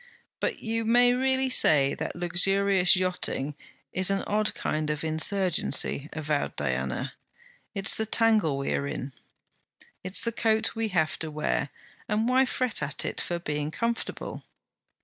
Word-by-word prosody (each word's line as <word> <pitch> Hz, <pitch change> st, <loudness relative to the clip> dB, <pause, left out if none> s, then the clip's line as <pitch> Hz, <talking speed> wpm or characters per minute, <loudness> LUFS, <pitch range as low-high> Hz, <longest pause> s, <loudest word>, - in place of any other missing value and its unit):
'But -, -, -3 dB
you 225 Hz, 0 st, -1 dB
may 245 Hz, +2 st, +4 dB
really 265 Hz, +1 st, +1 dB
say 145 Hz, -, +3 dB
that -, -, -5 dB
luxurious 185 Hz, +2 st, +3 dB
yachting 180 Hz, -6 st, -1 dB, 0.4 s
is 185 Hz, +1 st, +2 dB
an 195 Hz, -1 st, 0 dB
odd 215 Hz, +1 st, -1 dB
kind 155 Hz, 0 st, -2 dB
of 150 Hz, 0 st, -2 dB
insurgency,' 160 Hz, -3 st, +2 dB
avowed 150 Hz, -2 st, -2 dB
Diana. 65 Hz, -2 st, -3 dB, 0.6 s
'It's 195 Hz, +1 st, +4 dB
the 220 Hz, -, -1 dB
tangle 215 Hz, -10 st, +2 dB
we 140 Hz, -, -2 dB
are 140 Hz, -, -1 dB
in.' 135 Hz, -1 st, -5 dB, 0.9 s
'It's 185 Hz, +4 st, -1 dB
the 230 Hz, -, -1 dB
coat 220 Hz, -1 st, +1 dB
we 225 Hz, -1 st, -2 dB
have 160 Hz, -6 st, 0 dB
to 160 Hz, -, -2 dB
wear; 150 Hz, -1 st, -2 dB, 0.4 s
and 215 Hz, +2 st, +1 dB
why 260 Hz, +1 st, +4 dB
fret 250 Hz, -5 st, -2 dB
at 150 Hz, 0 st, -1 dB
it -, -, -2 dB
for 175 Hz, -, -3 dB
being 150 Hz, -3 st, -3 dB
comfortable?' 230 Hz, +7 st, -4 dB
185 Hz, 150 wpm, -27 LUFS, 150-225 Hz, 0.9 s, may